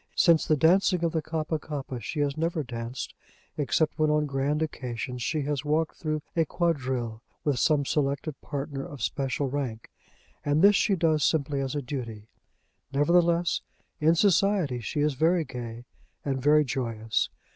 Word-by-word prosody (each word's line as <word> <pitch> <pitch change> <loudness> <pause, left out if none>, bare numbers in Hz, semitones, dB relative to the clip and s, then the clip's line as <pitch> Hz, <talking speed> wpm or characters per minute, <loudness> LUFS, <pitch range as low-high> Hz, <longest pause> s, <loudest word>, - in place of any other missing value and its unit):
Since 170 -3 +4
the 155 - +3
dancing 180 +3 +4
of 165 - +2
the 160 - 0
Kappa 160 0 -2
kappa 135 -5 -5
she 145 +7 -3
has 140 -1 0
never 165 0 -1
danced, 120 0 -5 0.4
except 150 +3 0
when 155 0 +3
on 150 0 +2
grand 140 +2 0
occasions 125 -4 -4
she 150 +4 -1
has 145 0 -2
walked 155 +2 0
through 155 -2 -2
a 165 - +4
quadrille 130 -9 -1 0.2
with 140 -5 +1
some 150 -3 +3
selected 140 +2 0
partner 140 -1 -4
of 145 -1 -7
special 140 0 -1
rank; 130 -5 -4 0.5
and 145 +3 +2
this 205 +1 +7
she 200 0 +3
does 160 -4 +2
simply 145 -3 +1
as 135 +1 -3
a 145 - -2
duty. 115 -5 -6 0.6
Nevertheless, 170 +4 +3 0.4
in 160 +2 +4
society 190 -7 +3
she 145 +6 -2
is 150 0 +2
very 165 +4 +2
gay 120 -2 -7 0.4
and 135 -2 -1
very 150 +2 +5
joyous. 115 -4 -1
145 Hz, 160 wpm, -27 LUFS, 130-160 Hz, 0.6 s, this